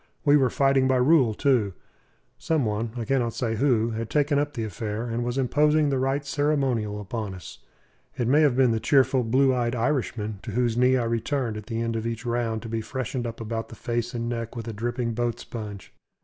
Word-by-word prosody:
We 145 Hz, 0 st, +6 dB
were 135 Hz, -3 st, +4 dB
fighting 135 Hz, -1 st, +3 dB
by 130 Hz, -, +3 dB
rule, 130 Hz, -3 st, +4 dB
too. 120 Hz, -9 st, +2 dB, 0.7 s
Some 155 Hz, -5 st, 0 dB
one 110 Hz, +2 st, -1 dB
I 115 Hz, -, -3 dB
cannot 120 Hz, -2 st, 0 dB
say 115 Hz, -3 st, -1 dB
who 120 Hz, -3 st, +2 dB
had 110 Hz, 0 st, -4 dB
taken 145 Hz, -1 st, +2 dB
up 145 Hz, 0 st, -1 dB
the 115 Hz, -, -2 dB
affair, 110 Hz, +1 st, -4 dB
and 120 Hz, +1 st, -2 dB
was 120 Hz, +2 st, -2 dB
imposing 150 Hz, +3 st, +3 dB
the 135 Hz, -2 st, 0 dB
right 135 Hz, +2 st, 0 dB
ceremonial 135 Hz, -8 st, 0 dB
upon 105 Hz, -1 st, -5 dB
us. 90 Hz, -4 st, -10 dB, 0.6 s
It 120 Hz, -, 0 dB
may 145 Hz, +5 st, +5 dB
have 145 Hz, -5 st, +4 dB
been 130 Hz, -3 st, +4 dB
the 115 Hz, -, 0 dB
cheerful, 130 Hz, 0 st, +3 dB
blue 130 Hz, +4 st, +3 dB
jerseyed 120 Hz, -1 st, 0 dB
Irishman, 115 Hz, -5 st, -1 dB
to 115 Hz, -, -6 dB
whose 120 Hz, -1 st, +1 dB
knee 125 Hz, +2 st, +4 dB
I 125 Hz, -, 0 dB
returned 115 Hz, +1 st, -1 dB
at 105 Hz, -1 st, -8 dB
the 115 Hz, -1 st, -2 dB
end 115 Hz, 0 st, -2 dB
of 115 Hz, 0 st, -2 dB
each 115 Hz, +1 st, -4 dB
round 115 Hz, -2 st, -1 dB
to -, -, -6 dB
be 115 Hz, 0 st, -2 dB
freshened 125 Hz, 0 st, -4 dB
up 115 Hz, -, -7 dB
around 115 Hz, 0 st, -3 dB
the -, -, -11 dB
face 120 Hz, +2 st, -3 dB
and 115 Hz, 0 st, -2 dB
neck 115 Hz, 0 st, -4 dB
with 115 Hz, -1 st, -6 dB
a 115 Hz, -, -4 dB
dripping 120 Hz, +2 st, -2 dB
boat 120 Hz, 0 st, -1 dB
sponge. 105 Hz, -5 st, -8 dB
120 Hz, 220 wpm, -25 LUFS, 115-135 Hz, 0.7 s, We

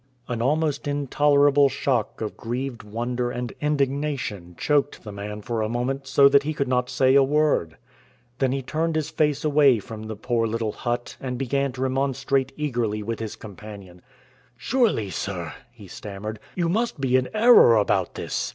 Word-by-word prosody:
An 120 Hz, -2 st, -3 dB
almost 150 Hz, +3 st, 0 dB
intolerable 145 Hz, 0 st, +3 dB
shock 125 Hz, -6 st, -1 dB
of 110 Hz, -, -4 dB
grieved 125 Hz, +1 st, -4 dB
wonder 120 Hz, +3 st, -3 dB
and 120 Hz, -1 st, -4 dB
indignation 140 Hz, -, -2 dB
choked 145 Hz, -1 st, 0 dB
the 105 Hz, -, -7 dB
man 105 Hz, +1 st, -7 dB
for 115 Hz, -1 st, -2 dB
a 110 Hz, -, -1 dB
moment 130 Hz, +3 st, -2 dB
so 140 Hz, +1 st, +6 dB
that 140 Hz, 0 st, +5 dB
he 155 Hz, +2 st, -3 dB
could 140 Hz, -, -1 dB
not 125 Hz, -1 st, 0 dB
say 130 Hz, 0 st, +3 dB
a 140 Hz, -, +7 dB
word. 145 Hz, -, +1 dB, 0.6 s
Then 135 Hz, -2 st, +2 dB
he 135 Hz, 0 st, -2 dB
turned 160 Hz, +4 st, -1 dB
his 155 Hz, 0 st, -1 dB
face 150 Hz, -1 st, 0 dB
away 145 Hz, -4 st, +5 dB
from 110 Hz, +1 st, -8 dB
the 110 Hz, -, -5 dB
poor 115 Hz, +2 st, 0 dB
little 110 Hz, -1 st, -2 dB
hut 120 Hz, +2 st, -4 dB
and 125 Hz, -2 st, -4 dB
began 140 Hz, +1 st, -1 dB
to 130 Hz, -, -4 dB
remonstrate 135 Hz, 0 st, 0 dB
eagerly 120 Hz, -8 st, -1 dB
with 115 Hz, +1 st, -4 dB
his 110 Hz, -2 st, -5 dB
companion. 100 Hz, -3 st, -11 dB, 0.6 s
"Surely, 215 Hz, -, +1 dB
sir," 90 Hz, -6 st, -4 dB, 0.2 s
he 115 Hz, -4 st, -14 dB
stammered, 105 Hz, +3 st, -7 dB, 0.2 s
"you 175 Hz, -2 st, 0 dB
must 215 Hz, -1 st, -1 dB
be 130 Hz, -2 st, +1 dB
in 130 Hz, 0 st, +2 dB
error 220 Hz, -, +7 dB
about 100 Hz, -4 st, +1 dB
this. -, -, -3 dB
130 Hz, 170 wpm, -24 LUFS, 110-140 Hz, 0.6 s, a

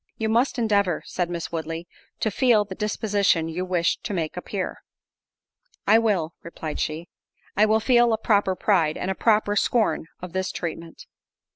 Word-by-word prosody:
"You 220 Hz, -1 st, -1 dB
must 240 Hz, +5 st, +2 dB
endeavour," 200 Hz, -7 st, +1 dB
said 175 Hz, -1 st, -2 dB
Miss 170 Hz, -1 st, -4 dB
Woodley, 165 Hz, +1 st, -4 dB, 0.3 s
"to 220 Hz, -, +1 dB
feel 225 Hz, -1 st, +3 dB
the 195 Hz, -, -7 dB
disposition 200 Hz, -4 st, +1 dB
you 165 Hz, +3 st, -3 dB
wish 180 Hz, -2 st, +1 dB
to 205 Hz, -, -4 dB
make 160 Hz, -3 st, -2 dB
appear." 185 Hz, +1 st, -4 dB, 1.1 s
"I 220 Hz, +3 st, +6 dB
will," 190 Hz, -8 st, 0 dB
replied 160 Hz, -2 st, -6 dB
she, 160 Hz, +3 st, -3 dB, 0.5 s
"I 215 Hz, +2 st, +4 dB
will 220 Hz, +1 st, +3 dB
feel 240 Hz, 0 st, +4 dB
a 220 Hz, -, +2 dB
proper 205 Hz, -3 st, +2 dB
pride—and 180 Hz, -2 st, +1 dB
a -, -, 0 dB
proper 210 Hz, 0 st, +2 dB
scorn 210 Hz, -7 st, +1 dB
of 180 Hz, -1 st, -8 dB
this 190 Hz, 0 st, -1 dB
treatment." 165 Hz, -1 st, -6 dB
190 Hz, 160 wpm, -24 LUFS, 170-215 Hz, 1.1 s, I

